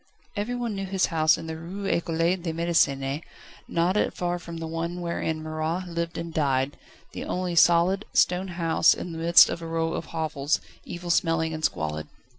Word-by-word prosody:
Everyone 235 +2 -2
knew 195 -1 -4
his 190 0 +1
house 155 0 +4
in 165 - -7
the 160 0 -5
Rue 185 +5 -7
Ecole 170 -3 -1 0.2
de 175 -2 -4
Médecine, 145 -4 +1 0.5
not 170 +3 +1 0.2
far 175 0 -1
from 170 -1 -8
the 165 - -5
one 165 +2 -3
wherein 165 -2 -2
Marat 155 +3 -2
lived 170 -1 -3
and 165 -1 -5
died, 135 -3 +1 0.4
the - - -6
only 180 -1 -2
solid, 175 +4 +4
stone 180 +2 +2
house 165 -3 +3
in 175 - -6
the 165 - -6
midst 170 +1 +7
of 170 - -4
a 165 - -6
row 165 0 -1
of - - -3
hovels, 155 -2 -1 0.3
evil 175 0 -4
smelling 165 -1 +1
and 155 0 -6
squalid. 75 - -1
165 Hz, 180 wpm, -26 LUFS, 160-175 Hz, 0.5 s, midst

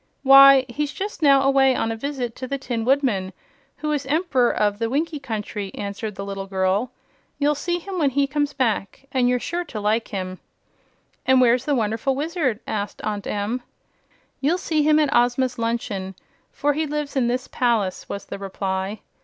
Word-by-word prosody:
"Why, 275 -1 +8
he's 290 +4 -3
just 400 +1 -5
now 275 -2 +5
away 270 -1 +4
on 225 - -1
a - - -2
visit 250 -1 -4
to 255 - -5
the 275 - -2
Tin 240 -4 -3
Woodman, 240 -9 +1 0.4
who 305 0 -2
is 285 -3 -2
Emp'ror 285 -5 +2
of 205 0 0
the 230 -1 -1
Winkie 305 +4 -1
Country," 210 -6 -5
answered 205 +1 -5
the 200 - -5
little 195 -1 -5
girl. 190 +5 0 0.5
"You'll 295 +1 +2
see 345 +4 -2
him 370 +1 -5
when 290 -4 +3
he 280 +1 +1
comes 290 +1 -1
back, 250 -4 -2
and 250 -2 +2
you're 250 - +2
sure 345 +7 -3
to 220 - -6
like 215 +2 0
him." 185 -2 -5 0.9
"And 260 0 +5
where's 250 0 +4
the 290 - +1
Wonderful 225 +3 0
Wizard?" 290 - -1
asked 205 -1 -4
Aunt 205 -2 -3
Em. 210 +5 -2 0.8
"You'll 305 +6 +1
see 315 -4 0
him 305 +1 +4
at 300 -2 +2
Ozma's 245 +1 +2
luncheon, 210 -5 -2 0.4
for 290 0 0
he 310 +2 -1
lives 295 -1 -3
here 270 - +1
in 240 - +2
this 250 +1 -1
palace," 225 -7 0
was 200 - -5
the - - -7
reply. 195 +1 -3
255 Hz, 185 wpm, -23 LUFS, 210-285 Hz, 0.9 s, Why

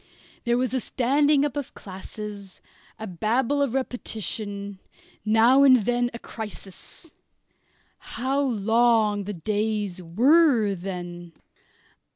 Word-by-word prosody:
There 240 0 +2
was 255 0 -1
a 260 - +1
standing 285 +4 +2
up 295 - -3
of 285 -3 -5
classes, 200 0 -9 0.4
a 220 - -6
babble 230 - 0
of 270 -3 0
repetition, 205 -5 -3 0.4
now 225 +5 +5
and 270 -2 +7
then 245 +1 +1
a 235 - -7
crisis. 220 - -10 0.9
How 270 +3 -2
long 225 -3 +2
the 210 - -4
days 205 0 -2
were 235 - +3
then! 175 -2 -7
220 Hz, 110 wpm, -25 LUFS, 200-255 Hz, 0.9 s, and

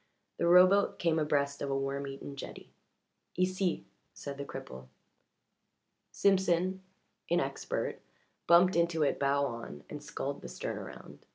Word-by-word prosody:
The 170 - +1
rowboat 185 +3 +6
came 165 -2 +1
abreast 140 -2 0
of 140 - -2
a 135 - 0
worm 140 +1 -2
eaten 135 +1 -7
jetty. 140 - -9 0.6
"Ici," 185 0 0 0.3
said 140 -1 -7
the 140 - -4
cripple. 65 - -8 1.2
Simpson, 190 -1 +2 0.5
inexpert, - - -1 0.5
bumped 180 +2 +6
into 170 -2 +2
it 140 - +1
bow 140 0 +2
on, 115 - -6
and - - -6
sculled - - -4
the - - -7
stern - - -4
around. - - -11
155 Hz, 130 wpm, -31 LUFS, 140-180 Hz, 1.2 s, rowboat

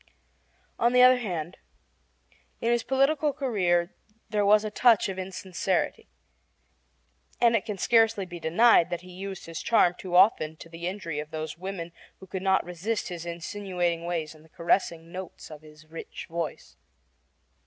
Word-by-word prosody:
On 235 +1 +3
the 250 0 +7
other 255 0 +7
hand, 175 -6 -4 1.0
in 230 - 0
his 240 0 +2
political 275 +4 +1
career 185 -10 0 0.4
there 210 -1 +1
was 210 +1 +5
a 215 - -3
touch 230 -1 +4
of 190 -1 -5
insincerity, 185 0 -2 1.3
and 235 -1 +4
it - - 0
can 210 -3 -4
scarcely 225 -1 +3
be 175 -1 -9
denied 175 +3 +4
that 175 -1 -3
he 180 0 -13
used 190 +1 -7
his 165 -1 -6
charm 200 -6 +4
too 180 -1 -5
often 160 -5 +4
to 165 - -12
the 170 +1 -6
injury 180 -5 -4
of 150 0 -6
those 155 0 -5
women 175 -1 -6 0.3
who 190 - -11
could 185 0 -5
not 190 0 +2
resist 190 +6 -3
his 175 -1 -6
insinuating 175 -1 -3
ways 165 -3 -3
and 155 -1 -18
the 160 - -21
caressing 170 0 0
notes 185 -3 -8
of 155 -1 -10
his 155 0 -16
rich 160 +1 -9
voice. 165 -1 -5
185 Hz, 165 wpm, -27 LUFS, 170-210 Hz, 1.3 s, the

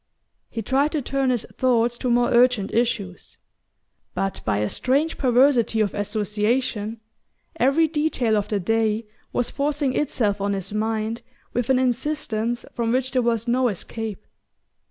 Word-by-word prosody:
He 225 - -5
tried 275 +7 +1
to 305 - 0
turn 270 +1 0
his 245 -3 0
thoughts 240 -2 +2
to 250 - -1
more 240 0 +3
urgent 240 -4 +3
issues; 215 -6 -2 0.8
but, 195 0 -2
by - - 0
a 105 +1 0
strange 285 - 0
perversity 250 -3 +3
of 210 -3 +1
association, 210 +2 -1 0.6
every 280 +6 +4
detail 295 -7 0
of 205 -1 0
the 210 -2 -1
day 220 +3 0 0.3
was 245 - 0
forcing 285 -2 0
itself 215 -8 0
on 200 0 0
his 195 0 -4
mind 220 +1 -1 0.3
with 245 0 -1
an 265 - +4
insistence 245 -3 -1
from 230 -1 -1
which 260 +1 0
there 255 - +2
was 230 -1 0
no 250 +1 +2
escape. 215 0 -5
235 Hz, 150 wpm, -23 LUFS, 215-260 Hz, 0.8 s, every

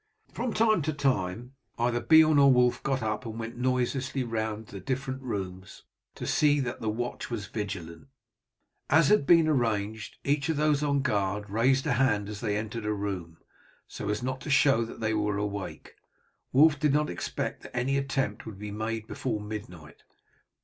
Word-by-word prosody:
From 240 0 -2
time 220 -4 +3
to 155 +1 -1
time 125 -4 -1 0.2
either 120 0 +1
Beorn 160 -2 +6
or 140 -1 +7
Wulf 125 -1 +3
got 135 -2 -1
up 105 -1 -2
and 115 -1 -6
went 115 +1 -6
noiselessly 130 +1 0
round 110 -2 -3
to - - -15
the 100 - -6
different 130 0 -3
rooms 95 -6 -6 0.3
to - - -6
see 145 -1 +3
that 125 -3 -3
the 110 - -1
watch 120 +3 -4
was 115 -5 -4
vigilant. 90 -4 -6 0.8
As 160 0 +5
had 210 -10 +4
been 165 -2 +6
arranged, 110 -6 -1
each 140 +2 0
of 160 - 0
those 150 -1 +2
on 140 -2 +1
guard 100 -2 -1
raised 130 +5 +2
a 150 - +2
hand 105 -5 +1
as 105 -1 -7
they 105 -3 0
entered 110 0 -4
a 105 - +1
room, 95 -5 -4 0.5
so 105 - -6
as 105 +2 -1
to 130 +4 -4
show 135 -4 +4
that 115 - -10
they 110 0 0
were 105 -1 0
awake. 100 -2 -5 0.6
Wulf 145 +2 +5
did 150 -3 +2
not 150 +1 +1
expect 85 - -4
that - - -9
any 130 +3 +1
attempt 135 -6 -1
would 110 -3 -8
be 105 +1 -6
made 110 +1 -3
before 110 -1 -3
midnight. 100 -8 -8
120 Hz, 180 wpm, -28 LUFS, 105-140 Hz, 0.8 s, or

